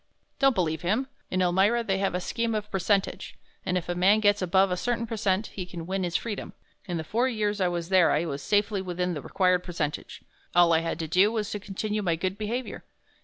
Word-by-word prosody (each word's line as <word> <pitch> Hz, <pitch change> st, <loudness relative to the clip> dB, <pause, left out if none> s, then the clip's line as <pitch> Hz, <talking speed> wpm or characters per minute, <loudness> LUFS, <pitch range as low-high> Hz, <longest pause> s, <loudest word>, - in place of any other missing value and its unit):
"Don't 270 Hz, -2 st, +4 dB
believe 160 Hz, -4 st, 0 dB
him. 215 Hz, +10 st, 0 dB, 0.2 s
In 185 Hz, 0 st, +1 dB
Elmira 195 Hz, +7 st, +3 dB
they 195 Hz, -4 st, 0 dB
have 195 Hz, -2 st, 0 dB
a -, -, 0 dB
scheme 230 Hz, +4 st, -2 dB
of 210 Hz, 0 st, -4 dB
percentage, 195 Hz, +1 st, 0 dB, 0.3 s
and 180 Hz, 0 st, 0 dB
if 180 Hz, -, -4 dB
a 175 Hz, -, -1 dB
man 190 Hz, +4 st, +4 dB
gets 205 Hz, -1 st, +3 dB
above 190 Hz, +1 st, +3 dB
a -, -, +1 dB
certain 235 Hz, +5 st, -1 dB
percent 210 Hz, -2 st, -1 dB
he 190 Hz, -, -4 dB
can 175 Hz, -2 st, -8 dB
win 190 Hz, +1 st, -2 dB
his 175 Hz, -1 st, -3 dB
freedom. 215 Hz, -3 st, -3 dB, 0.3 s
In 175 Hz, -2 st, -2 dB
the 160 Hz, -, -3 dB
four 235 Hz, +10 st, 0 dB
years 210 Hz, -3 st, -1 dB
I 185 Hz, -, +3 dB
was 175 Hz, -1 st, -3 dB
there 185 Hz, -3 st, +5 dB
I 155 Hz, +3 st, +1 dB
was 145 Hz, -3 st, -4 dB
safely 205 Hz, +1 st, +1 dB
within 180 Hz, -1 st, -2 dB
the 150 Hz, -, -5 dB
required 180 Hz, +4 st, +1 dB
percentage 155 Hz, -4 st, -4 dB, 0.3 s
all 175 Hz, -1 st, +6 dB
I 160 Hz, -, +5 dB
had 165 Hz, -1 st, -3 dB
to 165 Hz, -2 st, -4 dB
do 185 Hz, +6 st, +4 dB
was 215 Hz, -3 st, -2 dB
to 210 Hz, -, -3 dB
continue 210 Hz, +2 st, -3 dB
my 175 Hz, -4 st, +1 dB
good 185 Hz, +3 st, -2 dB
behavior. 225 Hz, +4 st, -4 dB
190 Hz, 225 wpm, -27 LUFS, 175-210 Hz, 0.3 s, all